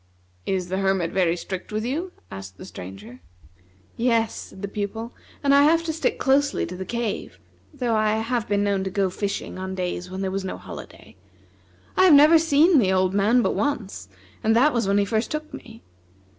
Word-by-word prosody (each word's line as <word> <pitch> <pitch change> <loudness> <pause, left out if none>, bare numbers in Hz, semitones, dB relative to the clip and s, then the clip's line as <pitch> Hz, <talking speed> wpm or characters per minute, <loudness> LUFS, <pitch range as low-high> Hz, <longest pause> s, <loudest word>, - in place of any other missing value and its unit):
"Is 185 -2 -1
the 190 +1 -1
Hermit 190 -3 +1
very 175 -3 +2
strict 185 +3 -6
with 215 +1 -2
you?" 325 +9 -3 0.2
asked 95 0 -9
the - - -10
Stranger. 95 +7 -10 0.8
"Yes," 230 -2 +1
said 190 - -10
the - - -1
Pupil, 210 +3 -5 0.3
"I 280 0 +5
have 325 +3 +4
to 325 -1 -2
stick 320 - -1
closely 280 +1 +2
to 180 - -7
the 190 +1 -6
cave; 235 -2 -3 0.3
though 250 -6 -1
I 215 0 +2
have 225 +1 -1
been 205 0 +2
known 200 -1 0
to 190 - -2
go 190 -1 0
fishing 200 -1 -4
on 190 0 -4
days 180 -1 -3
when 190 +1 -5
there 190 -1 -2
was 195 0 -3
no 190 - -5
holiday. - - -11 0.8
I 375 - +5
have 340 -6 +8
never 305 +3 +7
seen 315 +1 +4
the 190 -5 +2
old 185 0 +2
man 215 +5 +3
but - - +1
once, 210 - -3 0.4
and 220 +1 +3
that 280 +6 +4
was 235 -4 0
when 200 +1 +2
he 200 - +3
first 220 +2 -1
took 305 0 -5
me. 225 -3 -11
210 Hz, 200 wpm, -24 LUFS, 190-255 Hz, 0.8 s, have